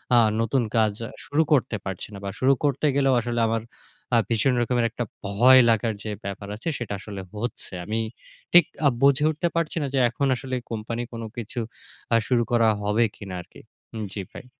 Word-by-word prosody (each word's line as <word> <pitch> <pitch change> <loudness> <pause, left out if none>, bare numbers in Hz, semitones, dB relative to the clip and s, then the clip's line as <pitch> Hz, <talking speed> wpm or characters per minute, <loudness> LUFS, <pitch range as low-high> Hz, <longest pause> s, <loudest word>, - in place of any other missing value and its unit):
আ - - +7 0.2
নতুন 120 +3 +1
কাজ 110 -2 +3 0.3
শুরু 155 +3 +2
করতে 125 -5 +2
পারছি 95 -2 -4
না 100 - -7
বা - - -2
শুরু 135 +1 +5
করতে 145 0 +1
গেলেও 135 -1 +3
আসলে 120 0 -2
আমার 115 0 0 0.5
আ - - +6
ভীষণ 120 +3 +2
রকমের 120 0 +1
একটা 120 - -3 0.2
ভয় 125 +6 +7
লাগার 115 0 +2
যে, 110 - -4
ব্যাপার 100 0 -5
আছে 120 +10 -4
সেটা 115 -4 -4
আসলে 100 -1 -7
হচ্ছে। 120 +4 -4
আমি 110 +1 -1 0.5
ঠিক 175 -2 +8 0.2
আ - - +8
বুঝে 140 +1 +5
উঠতে 155 +2 0
পারছি 170 0 -1
না 140 - -1
যে, 135 - +2
এখন 140 +4 -1
আসলে 130 +1 -4 0.2
company 115 +2 -3
কোন 115 - -5 0.2
কিছু 120 +1 -4 0.5
আ - - +6
শুরু 120 -2 +3
করা 115 -2 +4 0.2
হবে 105 +3 +2
কিনা 95 -3 -7
আরকি। - - -16 0.5
জ্বী 100 - -4
ভাই। - - -9
120 Hz, 190 wpm, -25 LUFS, 110-135 Hz, 0.5 s, ঠিক